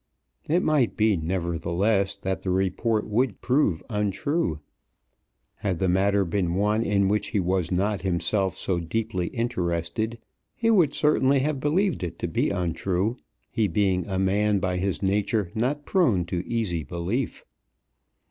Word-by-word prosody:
It 175 +4 +3
might 145 -7 +2
be, 110 -2 +3
nevertheless, 90 +4 0
that 95 0 -3
the 95 - -3
report 95 +4 0
would 115 0 0
prove 125 - +1
untrue. 105 - -1 1.0
Had 100 -4 -2
the 95 - 0
matter 100 +2 +2
been 85 -1 -1
one 105 +3 +2
in 100 -3 +2
which 105 +2 0
he 105 - -1
was 90 -1 0
not 100 +3 0
himself 95 +1 0
so 90 -3 -1
deeply 90 +1 -2
interested, 110 -1 -2 0.4
he 230 -1 +2
would 175 -10 +3
certainly 140 -2 +3
have 145 0 -1
believed 170 +7 +1
it 85 -2 -4
to - - -3
be 80 - 0
untrue, 90 +3 -1 0.4
he 110 -3 +1
being 95 -1 +1
a 95 -2 -2
man 100 +2 +2
by 95 -1 -1
his 95 +1 -2
nature 100 -1 0
not 135 +6 -1
prone 120 - +2
to 85 +1 -3
easy 105 -8 -1
belief. 85 - -3
100 Hz, 145 wpm, -25 LUFS, 90-115 Hz, 1.0 s, It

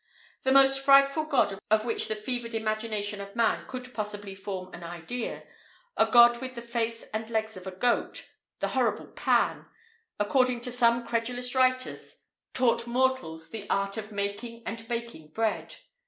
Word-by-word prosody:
The 265 - +1
most 270 0 +6
frightful 275 +2 +5
god 240 -10 +1
of 215 +1 +3
which 230 - -1
the 215 - -2
fevered 230 +1 -3
imagination 215 -2 -2
of 200 +1 -9
man 230 -1 +1
could 250 -1 -6
possibly 205 -2 -4
form 190 -1 -6
an 175 - -9
idea 175 +8 -5 0.5
a - - +4
god 240 0 +7
with 255 -1 -6
the 235 - -6
face 235 -1 -2
and 220 +1 -3
legs 220 -1 -1
of 185 0 -9
a - - -4
goat, 235 +6 0 0.3
the - - 0
horrible - - 0
Pan! - - +1 0.5
according 250 +3 +2
to 250 - -3
some 240 -1 +3
credulous 245 +2 -1
writers, 255 -1 0 0.3
taught 235 -2 +2
mortals 245 -10 0
the 210 -2 -7
art 200 0 0
of 220 -1 -6
making 205 +3 -4
and 225 0 -5
baking 235 -9 -5
bread. 220 +8 -2
230 Hz, 160 wpm, -28 LUFS, 205-250 Hz, 0.5 s, god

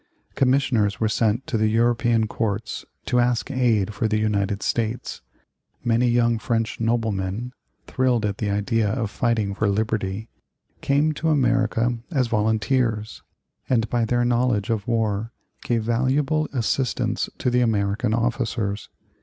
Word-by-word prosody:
Commissioners 125 -6 +2
were 110 - +2
sent 110 +2 +1
to 120 -8 -1
the 110 - +3
European 115 0 +2
courts 110 0 -3 0.2
to 125 - +1
ask 120 +2 +1
aid 115 -6 +1
for 110 +1 0
the 110 0 +1
United 100 -2 0
States. 115 +1 -2 0.6
Many 120 +1 +2
young 120 -1 +2
French 115 -1 -1
noblemen, 115 0 -1 0.3
thrilled 125 -4 +1
at 100 -1 -2
the 105 - -1
idea 105 +2 +1
of 110 -1 -2
fighting 110 -4 0
for 105 +1 0
liberty, 110 0 -1 0.5
came 145 +3 +2
to 160 +2 -1
America 120 -4 +1
as 135 -7 +1
volunteers, 110 0 0 0.5
and 115 -3 +2
by 120 -1 +2
their 120 +2 +1
knowledge 120 -4 +1
of 105 -3 -2
war 110 -1 0 0.3
gave 115 -2 0
valuable 135 +6 +1
assistance 120 -2 -1
to 125 - 0
the 125 0 +3
American 105 -1 +1
officers. 115 -3 -2
115 Hz, 135 wpm, -23 LUFS, 110-125 Hz, 0.6 s, the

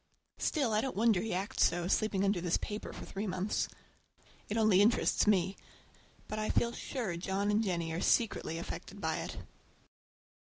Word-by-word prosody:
Still, 270 -8 +1
I 215 - +3
don't 265 - -3
wonder 215 -3 +3
he 225 - -3
acts 190 +3 0
so, 175 0 +2
sleeping 200 0 +1
under 195 -3 +1
this 175 -1 +1
paper 210 0 -5
for - - -8
three 200 +2 -4
months. 185 +2 -1 0.8
It 210 - -1
only 215 -4 +5
interests 220 0 +3
me, 195 -2 +3 0.7
but 215 - -4
I 215 - -1
feel 235 - +2
sure 235 -7 -4
John 195 +3 -1
and 210 +1 +3
Jennie 170 -5 -1
are 170 - -2
secretly 210 -7 +1
affected 185 +3 -7
by 160 -3 -1
it. - - -5
200 Hz, 170 wpm, -32 LUFS, 180-215 Hz, 0.8 s, only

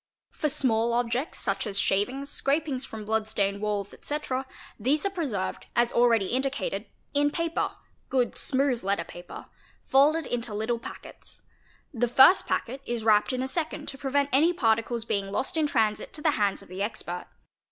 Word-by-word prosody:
For 300 - -1
small 235 -5 +2
objects 240 +4 -1
such 195 +2 0
as 200 -1 -2
shavings, 250 +9 +1
scrapings 280 -1 0
from 220 -4 -8
blood 220 0 0
stained 200 -1 0
walls, 205 -1 -2
etc., 270 -3 -3 0.3
these 280 - +1
are 395 - +1
preserved, 265 - -3
as 240 0 +2
already 235 -4 +4
| - - -4
indicated, 275 - -1 0.3
in 290 0 +3
paper 335 +2 -1 0.4
(good, 250 -3 +1
smooth 265 -4 +1
letter 200 +1 0
paper) 175 0 -10 0.4
folded 300 +4 +4
into 235 -4 -3
little 225 +3 -1
packets. - - -10 0.3
— - - -34
The 245 -1 +1
first 265 +10 +6
packet 265 +3 -2
is 235 -2 -2
wrapped 215 +1 +4
in 255 0 -1
a - - -2
second 310 0 -2
to 270 - -8
prevent 280 0 +1
any 320 +6 +5
particles 230 -4 +1
being 195 -3 -2
lost 265 - -1
in 315 -2 +2
transit 220 -6 0
to 300 - -4
the 305 - +4
hands 205 -7 0
of - - -17
the 185 +2 -6
expert. 200 -4 -3
245 Hz, 175 wpm, -27 LUFS, 215-280 Hz, 0.4 s, first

